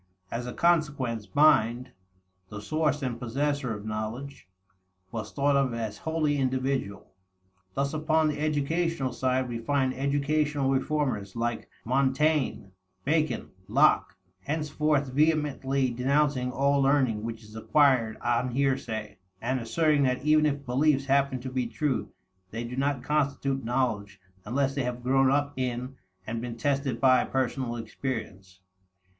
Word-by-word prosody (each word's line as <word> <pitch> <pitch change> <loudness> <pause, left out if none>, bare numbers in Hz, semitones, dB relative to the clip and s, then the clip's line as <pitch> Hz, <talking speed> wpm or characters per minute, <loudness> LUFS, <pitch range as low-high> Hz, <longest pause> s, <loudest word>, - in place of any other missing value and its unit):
As 120 +1 -3
a 125 - -5
consequence, 145 -10 +1
mind, 125 -5 +4 0.6
the 105 - -7
source 150 +5 0
and 120 -3 -3
possessor 135 0 -1
of 105 0 -9
knowledge, 110 +5 -5 0.6
was 110 -2 -5
thought 140 0 +2
of 135 -4 +1
as 110 -3 -4
wholly 160 -3 0
individual. 130 -5 -2 0.6
Thus 140 +1 0
upon 155 0 +2
the 150 -1 -2
educational 155 -1 0
side, 130 +1 0
we 120 -1 -4
find 130 +1 0
educational 145 +1 0
reformers, 135 -8 -1
like 120 0 -2 0.2
Montaigne, 135 -1 +1 0.4
Bacon, 155 +2 0 0.2
Locke, - - +3 0.3
henceforth 150 -2 0
vehemently 140 -3 +1
denouncing 130 +1 +1
all 140 +1 +2
learning 135 -6 +2
which 115 0 -6
is 105 +1 -14
acquired 125 -2 +3
on 120 +1 +1
hearsay, 115 -7 -1 0.2
and 130 +4 -1
asserting 150 +5 +2
that 130 -1 +1
even 155 0 +5
if 140 -1 -3
beliefs 135 +2 +2
happen 135 -1 +2
to 130 0 -6
be 130 -2 -1
true, 135 +2 -2 0.4
they 115 +4 -5
do 120 +1 -6
not 135 -1 -1
constitute 140 -2 0
knowledge 115 -5 -1 0.3
unless 135 +5 0
they 140 - -1
have 125 0 -4
grown 135 +1 +3
up 145 +1 +1
in 125 +1 -3 0.3
and 115 +1 -4
been 120 -1 -5
tested 135 -1 -1
by 130 0 +5
personal 130 -2 -2
experience. 105 -5 -6
135 Hz, 135 wpm, -27 LUFS, 120-145 Hz, 0.6 s, even